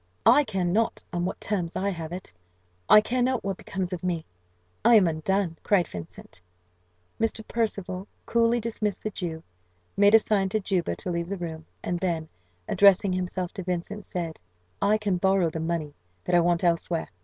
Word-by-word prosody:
"I 295 - +7
care 195 -5 -1
not 210 +6 0
on 175 0 -1
what 185 - -3
terms 180 -5 -2
I 200 +2 0
have 165 -4 -5
it 180 - -7 0.6
I 215 - +9
care 250 +3 -1
not 255 -1 +1
what 195 -2 -2
becomes 185 -1 -4
of 180 - -5
me 170 -3 -1 0.6
I 235 - +7
am 205 -4 +7
undone!" 165 +2 -1
cried 190 -5 +2
Vincent. 85 0 -9 0.8
Mr. 225 -1 -1
Percival 200 -4 -2 0.2
coolly 235 +1 +2
dismissed 215 -3 -2
the 215 - -2
Jew, 165 -4 -5 0.5
made 205 +2 +6
a - - +11
sign 205 -3 +1
to 215 - 0
Juba 190 -4 -1
to 180 - -5
leave 170 0 -2
the 200 - -3
room, 160 -3 -6 0.2
and 175 0 -2
then, 165 -4 -2 0.4
addressing 200 -1 +5
himself 180 -1 -3
to 190 - -5
Vincent, 180 +4 -3
said, 170 -4 -5 0.4
"I 215 +1 +4
can 205 -4 0
borrow 190 -2 +2
the 160 - -4
money 160 -2 -2 0.3
that - - -3
I 175 - +7
want 170 0 +2
elsewhere. 170 -1 0
185 Hz, 180 wpm, -26 LUFS, 170-205 Hz, 0.8 s, a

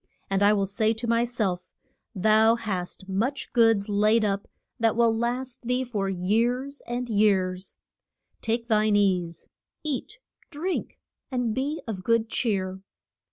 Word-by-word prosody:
And 195 0 +1
I 205 +1 +6
will 200 -2 +2
say 215 +3 +1
to 225 +2 -5
my 230 0 +2
self, 205 -7 -2 0.5
Thou 220 +3 +4
hast 190 -4 -4
much 230 +9 -2
goods 225 -4 +4
laid 215 +2 +3
up 200 -1 -1 0.3
that 225 -1 +2
will 230 -1 +3
last 245 +2 -2
thee 250 +1 +1
for 210 -6 -2
years 235 +9 0
and 240 +1 -3
years; 190 -4 +1 0.7
take 230 +1 -1
thine 215 -2 +3
ease, 180 -5 +1 0.4
eat, 295 -5 -4 0.3
drink, 340 +4 -3 0.3
and 245 -4 -1
be 280 +6 -2
of 195 -5 -4
good 230 0 +2
cheer. 190 -6 -1
220 Hz, 140 wpm, -26 LUFS, 200-240 Hz, 0.7 s, I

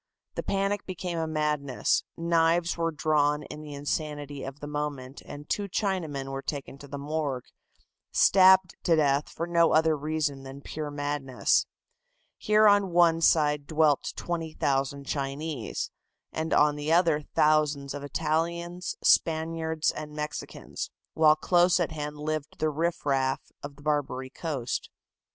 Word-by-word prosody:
The - - -3
panic 200 +1 -1
became 180 -2 -4
a 160 - -1
madness, 150 -4 0
knives 170 0 +2
were 165 -1 0
drawn 150 -1 +1
in 150 - -9
the 150 -1 -8
insanity 145 -1 -4
of 135 +2 -7
the 145 - -7
moment, 145 -3 -4
and 145 +1 -9
two 200 -1 -2
Chinamen 160 -10 -2
were 135 0 -4
taken 140 -1 -6
to 140 - -11
the 140 - -6
morgue, 140 -3 -3 0.7
stabbed 190 -1 +6
to 170 - +3
death 145 -2 +2
for 165 - -4
no 170 -1 +3
other 160 0 +4
reason 150 -2 -2
than 135 +1 -10
pure 150 +1 -5
madness. 145 -3 0 0.7
Here 215 0 +4
on 205 -2 +4
one 170 -1 +4
side 150 -3 +3
dwelt 155 -3 +2
20,000 140 -5 -2
Chinese, 140 -2 -3 0.4
and 160 +1 -3
on 150 0 +4
the 150 +2 -2
other 165 -3 +4
thousands 150 -2 +2
of 145 - -6
Italians, 170 +4 -2
Spaniards 160 0 +2
and 150 -1 -7
Mexicans, 150 0 -5 0.2
while 155 -1 +5
close 175 +3 +3
at 170 -2 0
hand 150 -1 -5
lived 155 0 -4
the 155 0 0
riff 165 +2 -2
raff 135 -2 0
of 145 0 -8
the 145 - -17
"Barbary 135 -3 -1
Coast." 140 -7 -3
150 Hz, 145 wpm, -27 LUFS, 145-165 Hz, 0.7 s, stabbed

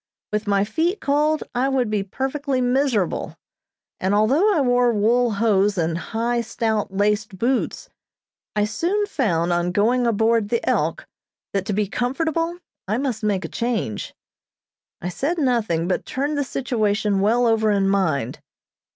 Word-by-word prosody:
With 210 +1 -1
my 200 -1 +3
feet 340 - 0
cold 300 +2 +1
I 255 +2 +1
would 255 -5 0
be 210 -2 +1
perfectly 270 +6 -2
miserable, 250 - 0 0.6
and 190 +2 +1
although 275 - +3
I 360 - +2
wore 245 -2 +3
wool 230 +2 +2
hose 205 -1 +2
and 165 -1 0
high, 235 +6 -1
stout 220 -3 -1
laced 205 0 0
boots, 245 +6 -1 0.7
I 210 0 +2
soon 345 - 0
found 175 - 0
on 175 +1 0
going 235 +6 +2
aboard 225 -1 +2
the 235 - -1
"Elk" - - 0 0.5
that 195 -1 -1
to 210 - -1
be 210 +1 +1
comfortable 320 - -1 0.3
I 215 +3 0
must 250 -4 -2
make 200 -4 0
a - - -3
change. 230 - -3 0.9
I 180 - -3
said 295 - -2
nothing, 225 - +1
but 185 - -1
turned 285 +3 -2
the 285 - 0
situation 215 -6 0
well 235 +4 +3
over 225 -2 +3
in 200 -2 +2
mind. 160 - 0
225 Hz, 150 wpm, -22 LUFS, 200-260 Hz, 0.9 s, my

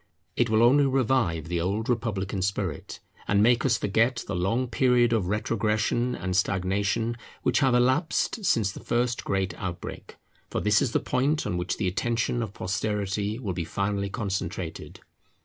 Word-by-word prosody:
It 120 - +2
will 110 +1 +4
only 140 +4 +5
revive 120 - +1
the 85 0 -1
old 100 +6 -1
republican 105 -5 -1
spirit, 95 -5 -3 0.3
and 100 0 +3
make 120 +1 +4
us 120 -5 +3
forget 115 +4 +1
the 100 - -4
long 115 +9 0
period 125 -1 +3
of 105 -6 +1
retrogression 110 +4 0
and 90 -1 -3
stagnation 100 +5 0 0.3
which - - +2
have 130 -3 +3
elapsed 150 - +1
since 110 - +2
the - - -9
first 120 0 -1
great 95 -1 -1
outbreak; 90 -2 -6 0.3
for - - -2
this 105 0 +3
is 120 - 0
the - - +3
point 140 +4 0
on - - -2
which 90 +1 -2
the 95 - -1
attention 115 +5 0
of 110 -4 -4
posterity 100 +2 -2
will 105 -7 -3
be 85 -1 -3
finally 100 +4 -2
concentrated. 100 -3 -4
105 Hz, 165 wpm, -26 LUFS, 95-120 Hz, 0.3 s, only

